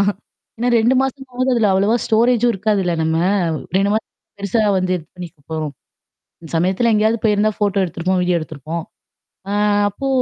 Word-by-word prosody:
எனக்கலாம். 200 - +3 0.5
ஏன்னா, 240 +2 0
2 235 +3 +3
மாசமாவது 265 -1 -2
அதுல 220 -4 +3
அவ்வளவா 200 +4 +2
ஸ்டோரேஜ்ம் 235 +1 +3
இருக்காதுல்ல 195 -2 0
நம்ம. 160 0 0 0.6
2 195 +1 +2
மாசம் 220 - -2 0.3
பெருசா 200 +3 0 0.2
வந்து 185 0 0
இது 165 - -8
பண்ணிருப்போம். 160 -3 -6 0.7
அந்த 165 - -12
சமயத்தல 190 +7 +2
எங்கேயாவது 215 +2 +2
போயிருந்தா 215 0 +2
ஃபோட்டோ 205 -2 +1
எடுத்திருப்போம் 180 +1 -1
வீடியோ 180 -1 +1
எடுத்திருப்போம். 155 +1 -6 0.7
ஆ - - -2 0.4
அப்போ 240 +7 -5
200 Hz, 145 wpm, -19 LUFS, 180-225 Hz, 0.7 s, எனக்கலாம்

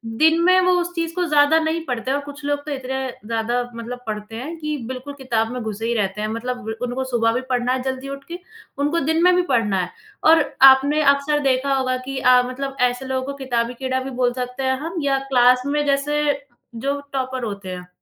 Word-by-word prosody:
दिन 320 +6 +4
में 370 +1 +6
वो 365 - +3
उस 350 0 -4
चीज़ 330 -1 -2
को 360 - 0
ज़्यादा 300 0 +4
नहीं 320 +1 -1
पढ़ते 250 0 -2
हैं। 280 - +2
और - - -4
कुछ 290 0 -10
लोग 290 0 -1
तो 305 - -5
इतने 265 -1 -3 0.2
ज़्यादा 230 +2 -1
मतलब 235 +2 -6
पढ़ते 210 +1 -5
हैं 300 +8 -6
कि 305 -1 -3
बिल्कुल 260 +2 -6
किताब 235 -5 -1
में 250 -1 -4
घुसे 220 0 -4
ही 235 - 0
रहते 205 -2 -1
हैं 215 - -1
मतलब 245 +2 -4 0.2
उनको 250 +1 -2
सुबह 235 -3 +1
भी 250 - -1
पढ़ना 250 0 +1
है 260 - -1
जल्दी 265 +1 -4
उठ 275 0 -7
के, 345 +1 -6 0.4
उनको 295 +4 +1
दिन 320 +3 +1
में 360 0 +6
भी 360 - +4
पढ़ना 210 -5 +2
है 180 - -4 0.3
और 320 -1 +6 0.2
आपने 270 +3 +7
अक्सर 280 +1 0
देखा 275 0 +1
होगा 260 -1 +1
कि 265 +1 -6
आप 250 -1 +5
मतलब 270 +2 -5
ऐसे 250 +1 +1
लोगों 260 0 -2
को 280 - -4
किताबी 245 -3 -1
कीड़ा 260 +1 -2
भी 270 - -5
बोल 245 -1 +1
सकते 250 +1 -4
हैं 260 0 +2
हम 335 +4 -5
या 275 -1 +2
क्लास 250 0 +5
में 295 +1 0
जैसे 285 +1 +1 0.5
जो 275 +5 -2
टॉपर 260 -1 -2
होते 200 -3 -5
हैं। 180 -1 -7
260 Hz, 225 wpm, -21 LUFS, 245-290 Hz, 0.5 s, आपने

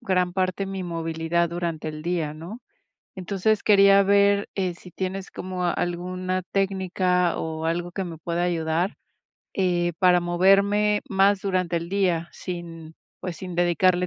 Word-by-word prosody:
gran 180 -2 0
parte 190 +1 -1
mi 190 -1 -4
movilidad 165 0 -1
durante 170 -2 -3
el 155 0 -7
día, 165 -3 -1
¿no? 175 +10 -9 0.6
Entonces, 200 +3 0
quería 200 -1 +6
ver, 200 +1 +3
eh, 185 -3 -1
si 180 +1 -14
tienes 190 +1 -4
como 185 -1 -4
alguna 180 +1 -2
técnica, 185 -2 +1
o, 160 0 -4
algo 175 +1 -1
que 190 +2 -3
me 170 -2 -7
pueda 170 +2 -2
ayudar, 170 +2 -1 0.6
eh, 175 -2 +1
para 180 -1 +5
moverme 200 +4 +3
más 195 -1 +3
durante 185 -3 -1
el 170 0 -3
día, 180 -4 0
sin, 165 -3 -7 0.2
pues, 180 -2 -5
sin 180 -2 -7
dedicarle 175 +1 +3
180 Hz, 145 wpm, -24 LUFS, 170-195 Hz, 0.6 s, quería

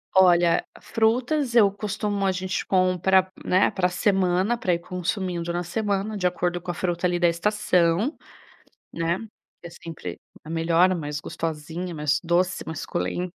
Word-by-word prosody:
Olha, 175 -2 +5 0.2
frutas 240 +4 0
eu 205 -4 +6
costumo 205 0 -3
a - - +3
gente 185 0 -2
compra, 185 0 +3 0.2
né, 185 +2 +3
pra 180 -2 +1
semana, 190 +2 +1
pra 235 -6 -1
ir 170 - +2
consumindo 180 -1 -3
na 175 +1 -2
semana 205 +2 -2
de 185 -3 +1
acordo 175 0 -1
com 180 - -9
a - - 0
fruta 175 0 -1
ali 175 0 0
da 175 - +4
estação, 190 - +1 0.8
né, 165 +1 0 0.5
é 170 - -7
sempre 160 - -8 0.3
a 155 - -11
melhor, 165 +2 +3
a - - +1
mais 150 -3 -4
gostosinha, 165 +3 -5
mais 150 0 +1
doce, 180 +2 +1
mais 160 -2 -5
suculenta, 175 - -3
180 Hz, 155 wpm, -24 LUFS, 170-195 Hz, 0.8 s, eu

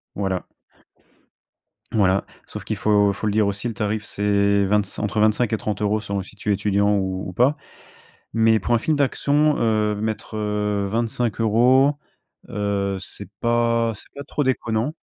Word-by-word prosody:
Voilà. 95 -2 -2 1.5
Voilà, 95 -3 +2 0.2
sauf - - -7
qu'il - - -3
faut 105 -1 +3
faut 100 +2 -3
le 105 - 0
dire 105 -1 +3
aussi 100 +4 -2
le 115 - -3
tarif 105 +1 -2
c'est 100 0 +2
vingt-cin 105 +1 0
entre 105 +1 -1
25 110 +2 +2
et 110 - +1
30€ 105 0 -1
selon 100 -2 -3
si 100 +3 -13
tu 105 - -4
es 105 - +4
étudiant 100 +1 +2
ou 95 -1 -2
ou 90 - -7
pas. 130 - +3 0.8
Mais 110 0 +4
pour 120 - 0
un 115 - +4
film 155 +6 0
d'action, 145 +2 +2
heu, 110 -2 +1
mettre, 110 +1 -4
heu, 105 -1 -1
25€ 115 +4 +2 0.6
heu, 100 -1 -1
c'est 90 - -9
pas 115 -1 +2
c'est 100 - -15
pas 140 - -7
trop 145 +1 -2
déconnant. 120 0 0
105 Hz, 165 wpm, -22 LUFS, 100-115 Hz, 1.5 s, es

